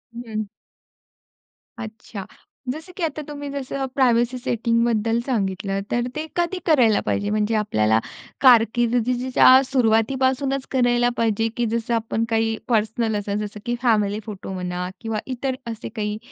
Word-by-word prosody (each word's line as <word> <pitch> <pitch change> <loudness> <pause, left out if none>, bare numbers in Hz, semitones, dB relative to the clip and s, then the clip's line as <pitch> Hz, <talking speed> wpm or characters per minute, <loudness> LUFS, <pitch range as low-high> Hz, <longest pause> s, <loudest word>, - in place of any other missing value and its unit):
हं. 225 -3 -4 1.3
अच्छा. 220 -3 -8 0.4
जसं 315 +7 -6
की 365 - -3
आता 310 -1 -2
तुम्ही 290 -1 -6
जसं 275 -1 -3
प्रायव्हसी 245 -1 +3
सेटिंगबद्दल 230 -2 +1
सांगितलं. 195 -5 -1
तर 240 0 0
ते 305 +1 -3
कधी 345 +2 0
करायला 250 - +4
पाहिजे? 205 0 0
म्हणजे 215 +1 +1
आपल्याला 110 - +2 0.4
कारकिर्दीच्या 245 +2 +5
सुरुवातीपासूनचं 260 +3 +1
करायला 245 -2 +3
पाहिजे 225 -1 +1
की 240 - +1
जसं 235 +1 -1
आपण 225 0 -1
काही 225 0 +1
पर्सनल 220 -1 +1
अस 205 0 -5
जसं 210 0 -5
की 240 - 0
फॅमिली 210 -4 +2
फोटो 195 -3 -7
म्हणा 180 -1 -3
किंवा 225 -2 -2
इतर 260 0 -3 0.2
असे 225 0 -7
काही 210 -1 -2
230 Hz, 130 wpm, -22 LUFS, 215-255 Hz, 1.3 s, कारकिर्दीच्या